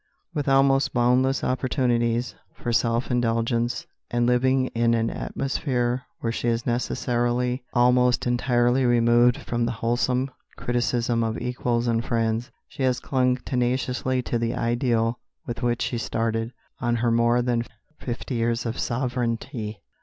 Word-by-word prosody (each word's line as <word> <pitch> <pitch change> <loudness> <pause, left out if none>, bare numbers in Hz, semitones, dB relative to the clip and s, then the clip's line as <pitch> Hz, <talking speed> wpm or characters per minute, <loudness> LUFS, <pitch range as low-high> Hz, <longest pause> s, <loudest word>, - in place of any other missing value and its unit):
With 145 -3 -1
almost 135 0 +3
boundless 125 +2 +2
opportunities 120 -2 0 0.2
for 120 - -3
self 115 +2 +1
indulgence, 115 0 0 0.2
and 120 0 +1
living 130 +2 +3
in 115 0 +2
an 115 0 0
atmosphere 125 -2 -2
where 115 - -1
she 120 - -3
is 115 0 0
necessarily 120 +1 0
almost 125 0 +4
entirely 120 +1 +2
removed 120 0 +4
from 120 0 -2
the 120 - -1
wholesome 125 +3 0 0.3
criticism 120 -1 0
of 115 0 -1
equals 120 -1 -1
and 115 0 +1
friends, 115 +1 -1 0.2
she - - -9
has 130 -1 +2
clung 125 -3 +1
tenaciously 125 0 0
to 120 - -1
the 115 0 -1
ideal 115 -1 0 0.3
with 120 0 -5
which 120 -1 0
she 120 - -2
started 115 0 -1 0.3
on 120 -1 0
her 120 0 +1
more 120 +1 +3
than 120 -1 0 0.4
fifty 125 +2 -5
years 115 0 0
of 115 +1 -3
sovereignty. 120 -2 -2
120 Hz, 140 wpm, -25 LUFS, 115-125 Hz, 0.4 s, almost